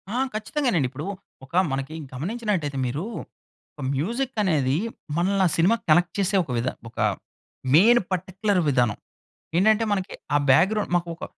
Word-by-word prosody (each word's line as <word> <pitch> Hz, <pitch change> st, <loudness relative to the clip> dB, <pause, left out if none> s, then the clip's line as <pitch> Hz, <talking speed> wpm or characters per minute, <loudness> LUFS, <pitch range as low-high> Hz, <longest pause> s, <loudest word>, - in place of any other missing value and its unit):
ఆ! -, -, 0 dB, 0.2 s
ఖచ్చితంగానండి. 215 Hz, -, 0 dB
ఇప్పుడూ 145 Hz, +7 st, -7 dB, 0.4 s
ఒక 135 Hz, -, -27 dB, 0.2 s
మనకి 135 Hz, +3 st, -3 dB, 0.2 s
గమనించినట్టయితే 175 Hz, -, -2 dB
మీరూ, 135 Hz, +7 st, -2 dB, 0.7 s
ఒక 150 Hz, -, -11 dB
మ్యూజిక్కనేదీ, 190 Hz, -, 0 dB, 0.4 s
మనల్ని 190 Hz, +3 st, +2 dB
ఆ -, -, 0 dB
సినిమాకి 195 Hz, +7 st, +3 dB
కనెక్ట్ 175 Hz, +1 st, +4 dB
చేసే 195 Hz, 0 st, +1 dB
ఒక 145 Hz, -, -8 dB
విధ 115 Hz, +2 st, -1 dB, 0.2 s
ఒక 115 Hz, -, -26 dB, 0.8 s
మెయిన్ 235 Hz, +8 st, +6 dB
పర్టిక్యులర్ 185 Hz, +2 st, 0 dB
విధానం. 120 Hz, -6 st, +2 dB, 0.6 s
ఏంటంటే, 220 Hz, +4 st, +4 dB
మనకి 190 Hz, -2 st, -2 dB, 0.2 s
ఆ -, -, +5 dB
బ్యాక్‌గ్రౌండ్ 200 Hz, +9 st, +3 dB
మాకు 170 Hz, 0 st, -6 dB
ఒక -, -, -7 dB
180 Hz, 135 wpm, -24 LUFS, 145-210 Hz, 0.8 s, మెయిన్